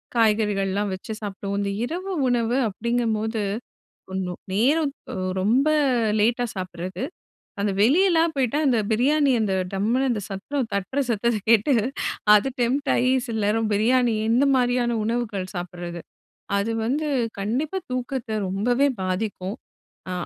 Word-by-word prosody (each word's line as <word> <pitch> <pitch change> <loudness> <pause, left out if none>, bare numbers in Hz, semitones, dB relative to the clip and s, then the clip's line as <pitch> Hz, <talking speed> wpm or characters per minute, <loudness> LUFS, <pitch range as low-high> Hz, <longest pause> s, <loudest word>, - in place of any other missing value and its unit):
காய்கறிகள்லாம் 210 -3 +1
வச்சு 195 +4 -6
சாப்பிடுவோம். 200 -1 -4
இந்த 200 - -1
இரவு 365 +7 -4 0.2
உணவு 240 0 +1
அப்படிங்கும்போது, 220 0 -1 0.7
ஒண்ணு 185 -1 -2 0.2
நேரம் 280 +8 +2 0.2
ஒ - - -5 0.3
ரொம்ப 245 +9 +3 0.5
லேட்டா 235 +3 +2
சாப்பிடறது, 185 +2 -5 0.6
அந்த 205 - +1
வெளியலாம் 330 - +4
போய்ட்டா 270 +1 +1
அந்த 245 -3 +3
பிரியாணி 280 +5 +3
அந்த 200 -3 0 0.2
டம்முனு 225 +7 +1
அந்த 215 - -2
சத்தம் 225 +6 -3
தட்டுற 200 +7 -1
சத்தத்த 235 0 +1
கேட்டு 230 +5 +5 0.6
அது 210 +5 +3
டெம்ப்ட் 270 +4 0
ஆயி, 255 +1 +2 0.2
சில 225 - -3
நேரம் 215 +1 +1
பிரியாணி, 235 +2 +3 0.2
இந்த 250 +4 +4
மாரியான 245 -1 +1
உணவுகள் 215 -5 -2
சாப்பிட்றது. 175 -1 -5 0.6
அது 200 +3 0
வந்து 295 +6 0 0.3
கண்டிப்பா 260 - -1
தூக்கத்த 255 -1 -3 0.2
ரொம்பவே 245 +8 +2 0.2
பாதிக்கும். 190 +1 -2 0.5
அ - - -3
230 Hz, 125 wpm, -24 LUFS, 200-255 Hz, 0.7 s, கேட்டு